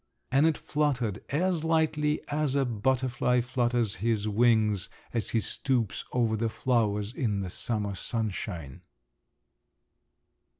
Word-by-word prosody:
And 140 +4 +5
it 160 - +1
fluttered 130 -9 -1
as 170 +3 +1
lightly 155 -2 +1
as 150 -2 0
a 140 -1 +3
butterfly 125 +1 +1
flutters 120 -4 0
his 110 +1 0
wings, 105 -4 +3 0.2
as 115 -4 -1
he 115 - +1
stoops 115 -2 -1
over 115 -3 +1
the 115 +1 0
flowers 110 -3 0
in 105 -7 -1
the 90 -2 -4
summer 105 -2 -2
sunshine. 95 - -4
120 Hz, 120 wpm, -28 LUFS, 105-135 Hz, 0.2 s, And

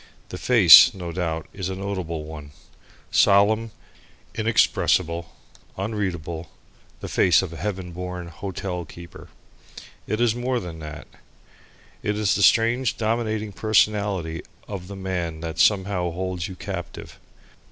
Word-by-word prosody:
The 90 - -7
face, 120 0 +8
no 90 -2 -6
doubt, 80 -2 -3
is 95 -2 -4
a 95 - -4
notable 95 -5 -4
one, 75 -2 -10 0.6
solemn, 105 +3 +4 0.6
inexpressible, 85 -6 +1 0.5
unreadable, 90 -6 -4 0.5
the - - -5
face 90 0 +3
of 90 - -5
the 85 - -8
heaven 95 -3 -4
born 90 0 -6
hotel 90 0 -5
keeper. 85 +2 -12 0.8
It 110 - -2
is 120 -2 +3
more 125 +1 -1
than 85 -6 -8
that. 75 -2 -8 1.0
It 105 0 -2
is 105 -2 +2
the - - 0
strange 115 +5 +3
dominating 110 -1 -1
personality 100 -4 +1 0.3
of 95 -3 -7
the 100 - -8
man 90 -4 -4
that 80 -1 -5
somehow 95 -3 +2
holds 90 0 -4
you 95 - -8
captive. - - -7
95 Hz, 130 wpm, -23 LUFS, 85-105 Hz, 1.0 s, face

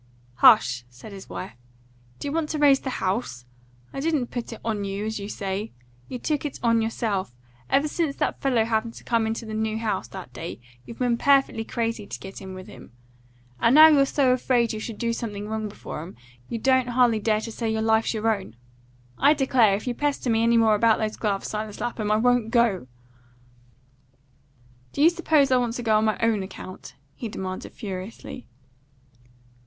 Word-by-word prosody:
"Hush!" 125 -1 +6
said 125 - -12
his 195 -1 -10
wife. 90 +5 -6 0.6
"Do - - -5
you - - -2
want 315 0 -1
to 310 - -2
raise 285 -2 +5
the 265 - -5
house? 185 - -2 0.5
I - - -4
didn't 290 -4 0
put 240 -1 -5
it 225 - -8
on 215 -3 -1
you, 200 +1 -3
as 220 0 -3
you 200 +1 -6
say. 200 +2 -4 0.3
You 250 - -5
took 295 +4 -2
it 295 - -5
on 230 -1 +3
yourself. 210 - -2 0.3
Ever 280 +2 +3
since 300 -2 -1
that - - -2
fellow 250 -5 +2
happened 225 0 -1
to - - -12
come 230 -2 +1
into 225 +1 -3
the 220 - -6
new 220 0 -1
house 215 -4 -2
that 190 -2 -10
day, 165 -4 -7 0.3
you've 230 - -9
been 245 -2 0
perfectly 275 -5 +3
crazy 225 -2 -3
to - - -7
get 190 0 -9
in 190 -1 -8
with 185 0 -9
them. 210 - -13 0.7
And 230 +3 +4
now 315 +1 +10
you're 280 -3 +4
so 265 -3 +3
afraid 245 -2 +1
you 215 - -4
shall 220 0 -6
do 230 +1 -1
something 210 -3 -5
wrong 220 0 -3
before 200 - -7
'em, 170 +4 -10 0.3
you 235 - -3
don't 260 +2 +2
hardly 240 -2 +3
dare 215 0 +1
to 225 - -6
say 225 0 -3
your 220 0 -1
life's 220 +1 +2
your 220 0 +2
own. 190 - -10 0.6
I 290 +3 +5
declare, 250 -7 +3
if 205 - -6
you 250 - -1
pester 280 -2 -1
me 225 0 +2
any 235 0 +4
more 225 -1 +5
about 220 +1 +4
those 215 -1 -2
gloves, 200 -3 -2
Silas 215 -1 -5
Lapham, 230 -3 -3
I - - +4
won't 245 0 +2
go." 225 - +2 2.1
"Do 285 - +1
you 330 - +7
suppose 310 -5 +2
I 255 - +5
want 240 -2 -1
to 245 - -4
go 220 -2 +3
on 220 - +1
my 215 - +1
own 225 -3 +2
account?" 190 -6 -9 0.2
he 230 - -6
demanded 185 -2 -6
furiously. 200 +4 -7
225 Hz, 200 wpm, -25 LUFS, 210-250 Hz, 2.1 s, now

